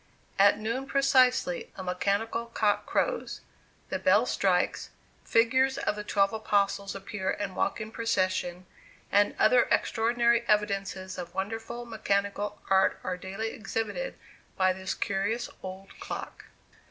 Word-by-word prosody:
At 200 +1 +6
noon 230 +5 -3
precisely 260 - +3
a 190 - -6
mechanical 200 +5 -1
cock 215 -3 0
crows; - - -1 0.5
the - - -2
bell - - +4
strikes; - - +1 0.3
figures 260 +4 +3
of - - -1
the 210 - -5
twelve 200 0 +2
apostles 200 -2 0
appear 195 0 -4
and 200 -2 -3
walk - - 0
in 215 0 -6
procession; 185 -5 -1 0.5
and 205 0 +3
other 245 +3 +5
extraordinary 235 0 +2
evidences 195 -3 0
of 175 -1 -7
wonderful 225 +4 -4
mechanical 205 -2 -1
art 190 -1 +3
are 185 - -2
daily 195 +5 -4
exhibited 225 - -4 0.4
by 185 -1 +3
this 190 +1 -4
curious 205 +4 -1
old 190 +1 -8
clock. - - -7
205 Hz, 130 wpm, -28 LUFS, 195-230 Hz, 0.5 s, At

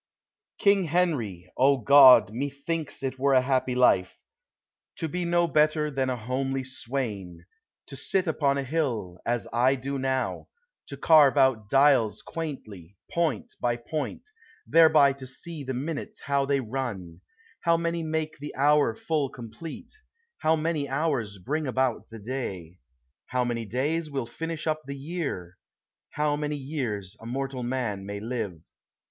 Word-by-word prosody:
King 200 -3 +3
Henry. 130 - -1
— - - -28
O 135 +1 +5
(Jod! 135 -5 +8
methinks, 140 +4 -4
it 130 -1 -3
were 140 +1 +3
a 130 - +6
happy 130 -1 0
life, 95 -7 +3 0.8
To 165 - -3
be 175 +3 -3
no 175 0 +3
better 150 0 +2
than 135 -1 -1
a 125 - -1
homely 130 +3 -2
swain; 110 -10 -5 0.4
To 140 - -10
sit 190 +6 0
upon 145 -4 +1
a 140 - -1
hill, 125 - -2
as 120 0 -1
I 125 +3 +3
do 135 +1 -4
now, 130 0 -1 0.4
To 140 - -8
carve 145 -2 +6
out 130 -6 +3
dials 135 -5 +4
quaintly, 105 - -7
point 170 +9 -1
by 120 -1 +1
point, 135 +4 -4 0.4
Thereby 155 -4 +6
to 135 -1 -10
see 150 +3 -8
the 130 -1 -4
minutes 145 +4 -5
how 140 -1 0
they 140 -1 +1
run: 105 -9 -5 0.4
How 170 0 +2
many 170 0 -1
make 160 -1 -3
the 145 +1 -7
hour 145 -4 +3
full 150 -1 -1
complete, 125 +8 -9 0.5
How 160 +1 +3
many 155 -3 -1
hours 135 -8 -1
bring 145 - -2
about 130 -2 0
the 115 - -9
day, 100 -7 -6 0.5
How 125 -1 0
many 115 -1 -2
days 150 +8 -1
will 135 -4 -3
finish 165 +6 -5
up 155 -1 0
the 140 0 -5
year, 135 - -5 0.5
How 150 -1 0
many 150 0 -2
years 120 - -4
a 115 - -10
mortal 135 +1 -3
man 120 -5 -2
may 100 0 -5
live. 105 -7 -4
135 Hz, 155 wpm, -27 LUFS, 120-155 Hz, 0.8 s, Jod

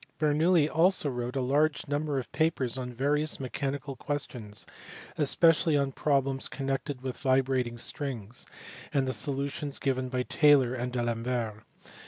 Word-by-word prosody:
Bernoulli 155 +1 +3
also 165 -2 +2
wrote 125 0 -4
a 135 - +1
large 145 +5 +1
number 145 0 -1
of 130 - -4
papers 155 -7 0
on 125 -1 -4
various 145 +5 0
mechanical 135 +1 -3
ques 145 +3 -1
tions, 105 -4 -4 0.5
especially 160 +1 +4
on 140 -1 +1
problems 135 -1 +1
connected 135 0 -3
with 130 -2 -4
vibrating 130 -2 +1
strings, 120 -3 -5 0.4
and 135 -2 +1
the 130 - -1
solutions 140 +1 -2
given 130 -2 -1
by 125 0 -1
Taylor 140 -4 +4
and 125 0 -3
by 125 -1 -1
D - - -1
Alembert. 115 -2 -2
135 Hz, 150 wpm, -29 LUFS, 125-145 Hz, 0.5 s, especially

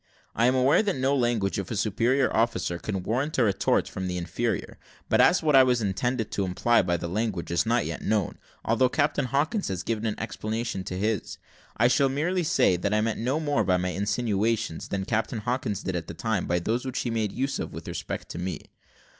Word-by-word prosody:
I 115 - +3
am 130 - +3
aware 130 +7 +4
that 205 -3 0
no 135 +2 +1
language 120 -7 +1
of 95 - -5
a 115 - -3
superior 115 +6 +1
officer 90 -7 0
can 95 -2 -3
warrant 130 +10 -1
a 130 - +4
retort 100 -4 +2
from 95 - -5
an - - -2
inferior; 90 +6 -3 0.3
but, - - +4
as 180 - +4
what 150 -3 +3
I 135 - +9
intended 120 -1 0
to 100 - -1
imply 95 +6 +2
by 85 -1 0
that 85 - -4
language 95 -2 -2
is 85 +6 +1
not 120 +1 +2
yet - - -4
known, 105 -3 -1 0.3
although 120 +3 +3
Captain 145 -1 +1
Hawkins 150 - 0
has 95 -2 -3
given 115 -1 -2
an 105 - -3
explanation 110 -2 -3
to 90 - -4
his; 105 0 -2 0.4
I 120 - +5
shall 135 +2 +3
merely 165 +7 0
say, 135 - +3
that 100 +4 0
I - - +3
meant 110 0 -1
no 130 +7 0
more 145 -7 +1
by 90 -2 +2
my 90 0 -1
insinuations, 105 0 -1
than 95 -1 -3
Captain 110 +1 -1
Hawkins 120 -4 -2
did 95 - -2
at 85 -2 -3
the 85 - -7
time 110 0 -1
by 85 - +1
those 110 +8 -1
which 130 -1 -3
he 120 - -2
made 110 -3 -1
use 135 +2 -2
of - - -4
with - - -8
respect - - -5
to - - -6
me. 90 +1 -5
115 Hz, 220 wpm, -26 LUFS, 95-130 Hz, 0.4 s, I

